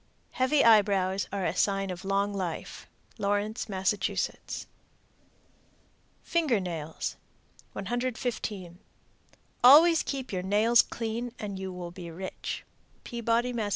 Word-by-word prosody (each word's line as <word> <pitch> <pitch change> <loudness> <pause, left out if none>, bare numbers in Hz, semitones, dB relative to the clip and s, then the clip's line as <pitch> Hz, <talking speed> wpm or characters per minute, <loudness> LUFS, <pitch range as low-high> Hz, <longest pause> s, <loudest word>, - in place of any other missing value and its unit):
Heavy 260 +3 +2
eyebrows 200 -4 +4
are 195 -2 -2
a 165 - -1
sign 195 -1 +1
of 180 +1 -7
long 200 +1 0
life. 185 -4 -5 0.3
Lawrence, 205 +2 -1
Mass. 190 0 +1 2.3
FINGER 310 -10 +1
NAILS. 165 -4 -4 0.6
115. 225 -7 -3 0.8
Always 320 +6 +8
keep 265 -5 -4
your 185 - -1
nails 215 +5 +4
clean 235 +1 -4
and 200 -2 -5
you 190 0 -4
will 180 -1 -7
be 175 -1 -8
rich. 185 +3 -6 0.4
_Peabody, 235 +1 0
Mass. 220 -3 -1
205 Hz, 110 wpm, -28 LUFS, 190-235 Hz, 2.3 s, Always